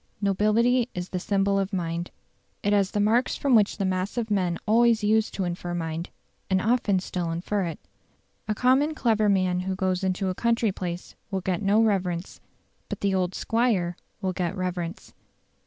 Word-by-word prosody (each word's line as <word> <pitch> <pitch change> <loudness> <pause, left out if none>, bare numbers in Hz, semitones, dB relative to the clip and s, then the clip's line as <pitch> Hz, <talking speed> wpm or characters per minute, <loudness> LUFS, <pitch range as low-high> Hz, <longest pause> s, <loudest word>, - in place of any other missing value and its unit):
Nobility 220 +5 +2
is 180 0 -4
the 185 - -2
symbol 195 +1 +1
of 195 +1 -2
mind. 170 -2 -2 0.5
It 205 - +2
has 200 -2 +3
the 205 - -2
marks 225 +5 +2
from 275 -2 +1
which 210 -3 +4
the 200 - -1
mass 185 +3 -2
of 225 -2 -2
men 180 -4 +1
always 230 0 +4
used 220 +1 +2
to 195 - -1
infer 175 0 -3
mind, 165 0 -3 0.4
and 190 0 +3
often 220 -2 +2
still 180 -2 -3
infer 180 +4 -1
it. 165 -2 -4 0.7
A 215 - 0
common 265 +6 +3
clever 220 -6 +2
man 185 -2 +2
who 190 +1 -2
goes 185 0 -1
into 190 +1 0
a - - -1
country 230 +1 +1
place 180 -2 -5 0.2
will 195 -2 -2
get 185 +1 -1
no 210 +3 +4
reverence; 185 -5 -1 0.5
but - - -5
the 200 -1 +1
"old 185 -1 0
squire" 225 -7 +1 0.3
will 185 -1 0
get 180 +1 -2
reverence. 180 0 -4
195 Hz, 180 wpm, -26 LUFS, 180-215 Hz, 0.7 s, which